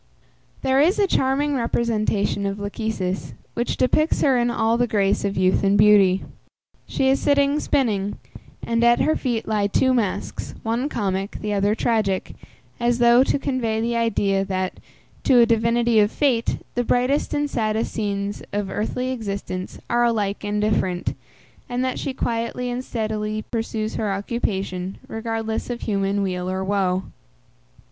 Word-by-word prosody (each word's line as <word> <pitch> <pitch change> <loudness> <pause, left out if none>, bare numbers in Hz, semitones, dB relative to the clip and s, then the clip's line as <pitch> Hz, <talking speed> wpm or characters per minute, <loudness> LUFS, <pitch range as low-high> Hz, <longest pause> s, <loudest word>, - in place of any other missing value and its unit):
There 265 0 +3
is 345 +8 +3
a 410 - +4
charming 285 -3 +1
representation 215 -4 0
of 195 0 -3
Lachesis, 200 - -3 0.2
which 240 - -2
depicts 305 +5 +2
her 270 -2 +4
in 240 0 +2
all 225 -1 +1
the 245 +1 +1
grace 200 -3 +1
of 200 -1 -2
youth 185 +1 +2
and 200 +1 +3
beauty. 200 -2 +5 0.6
She 265 - 0
is 270 +1 +3
sitting 285 0 +2
spinning, 210 -10 0 0.5
and 230 0 +1
at 240 0 +5
her 310 - +2
feet 240 -4 -2
lie 210 -2 +1
two 260 +6 +2
masks, 220 -7 -2
one 235 +5 -1
comic, 195 -4 -2
the 210 -1 -2
other 205 +1 +2
tragic, 215 -5 0 0.5
as 240 0 +2
though 240 +1 +6
to 275 - +1
convey 245 -6 -1
the 235 +1 -1
idea, 200 -4 +1
that, 185 -1 -3 0.5
to 260 - +5
a 235 - +7
divinity 230 0 +2
of 210 +1 +3
fate, 250 -6 +1 0.2
the 245 - 0
brightest 250 +4 +1
and 290 0 +1
saddest 220 -4 -1
scenes 200 -1 -2
of 200 -1 -2
earthly 250 +5 -2
existence 200 -6 -5
are 240 0 +2
alike 210 -4 0
indifferent, 205 -3 0 0.5
and 250 +1 -1
that 255 - -2
she 275 - -2
quietly 240 0 -2
and 245 +1 -3
steadily 215 -2 -3
pursues 225 -1 -2
her 215 -2 -1
occupation, 195 -3 -3
regardless 225 0 -3
of 240 -1 -4
human 200 -1 0
weal 180 -1 -2
or 190 0 -2
woe. 190 -1 0
220 Hz, 155 wpm, -22 LUFS, 200-245 Hz, 0.6 s, a